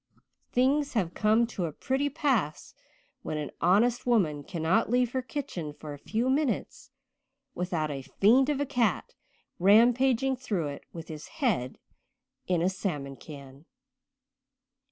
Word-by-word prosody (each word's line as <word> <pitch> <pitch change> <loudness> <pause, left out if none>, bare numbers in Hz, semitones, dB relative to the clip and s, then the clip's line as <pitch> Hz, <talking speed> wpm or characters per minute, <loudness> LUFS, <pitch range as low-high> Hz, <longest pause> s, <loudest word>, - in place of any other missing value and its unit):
Things 275 +3 +2
have 185 -8 0
come 220 +2 +3
to 200 -6 -4
a 160 - -3
pretty 265 - -1
pass 225 - -1 0.5
when 155 - -4
an 150 -1 -4
honest 220 +8 +3
woman 165 -12 +2
cannot 175 +6 0
leave 245 0 +2
her 260 - -1
kitchen 220 - -5
for 150 0 -8
a 145 - -10
few 225 - -1
minutes 270 -1 -1 0.6
without 170 -4 -2
a 135 -1 -4
fiend 240 - +3
of 290 -2 0
a 285 - +1
cat 250 -5 0 0.5
rampaging 245 +6 +4
through 200 - -2
it 140 - -8
with 165 -1 -9
his 155 -1 -8
head 225 - -1 0.7
in 175 -2 +1
a - - +3
salmon 150 -8 -4
can." 140 0 -12
210 Hz, 140 wpm, -28 LUFS, 155-250 Hz, 0.7 s, rampaging